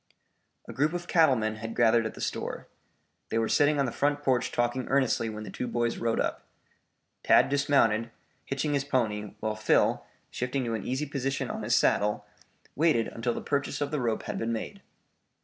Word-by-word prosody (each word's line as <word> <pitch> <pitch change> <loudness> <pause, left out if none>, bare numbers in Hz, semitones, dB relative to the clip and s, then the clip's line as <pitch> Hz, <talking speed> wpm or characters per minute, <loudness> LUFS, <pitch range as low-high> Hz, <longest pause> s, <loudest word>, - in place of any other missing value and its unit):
A - - -7
group 150 +4 +1
of 175 0 -4
cattle 160 -6 +4
men 110 -1 -2
had 115 +1 -6
gathered 115 -1 +4
at - - -9
the - - -9
store. - - -4 0.6
They 115 - -1
were 115 0 +1
sitting 145 0 +3
on 140 - +2
the 120 - -2
front 145 +3 0
porch 130 -3 +1
talking 120 +1 -1
earnestly 130 -4 +1
when 110 0 -6
the - - -8
two 125 - -4
boys 120 0 -1
rode 115 -1 0
up. - - -1 0.8
Tad - - +5
dismounted, 135 -6 +2 0.3
hitching 140 +2 -2
his 140 -1 +1
pony, 110 -7 -1
while 110 0 -1
Phil, 110 0 +2 0.3
shifting 125 +1 -2
to 115 - -2
an 110 -3 -4
easy 130 +4 -1
position 135 -2 -2
on - - -5
his 115 +3 +1
saddle, 105 0 +2 0.5
waited 150 -6 +2
until 115 +1 -2
the - - -4
purchase 140 -1 -2
of 145 -1 -2
the 150 -3 -1
rope 115 -2 -1
had - - -4
been 115 +1 -1
made. 190 - -5
125 Hz, 195 wpm, -28 LUFS, 115-140 Hz, 0.8 s, Tad